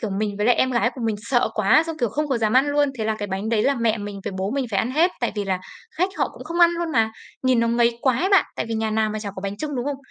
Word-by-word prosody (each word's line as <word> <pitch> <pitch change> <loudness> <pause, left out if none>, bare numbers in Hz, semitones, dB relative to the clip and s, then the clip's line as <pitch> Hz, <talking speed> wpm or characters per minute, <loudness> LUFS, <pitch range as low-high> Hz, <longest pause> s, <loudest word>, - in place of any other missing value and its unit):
kiểu, 220 - -3
mình 205 +1 -2
với 210 +2 0
lại 245 - +5
em 260 - +1
gái 235 -1 +2
của 260 - -8
mình 220 -2 0
sợ 245 +1 +1
quá, 215 +9 +4
xong, 325 -1 -4
kiểu, 240 - +1
không 295 +7 -2
có 260 - 0
dám 215 -1 +1
ăn 260 +3 +4
luôn, 290 0 +2
thế 220 - -2
là 220 0 0
cái 205 - -3
bánh 195 +3 -3
đấy 225 -2 +2
là 280 +3 +2
mẹ 230 -2 0
mình 205 -1 -6
với - - -3
bố 190 +2 -1
mình 270 0 -1
phải 195 - 0
ăn 230 - 0
hết, 325 +7 +3
tại 240 - 0
vì 205 -1 -2
là 190 -1 -1 0.4
khách 365 +3 +2
họ - - +1
cũng - - -10
không 340 +1 -3
ăn 340 - +7
luôn 340 -1 -3
mà, 225 -3 +2 0.3
nhìn 255 -2 +3
nó 230 - +1
ngấy 235 0 +2
quá 260 -1 +2
ấy 375 - +1
bạn. 390 -1 +5
Tại - - -2
vì 225 - -2
nhà 220 0 -1
nào 215 0 +1
mà 215 - -3
chả 205 -2 -5
có - - -5
bánh 200 0 -4
chưng, 295 +4 -4
đúng 245 - -2
không? 285 0 -2
235 Hz, 345 wpm, -23 LUFS, 215-280 Hz, 0.4 s, ăn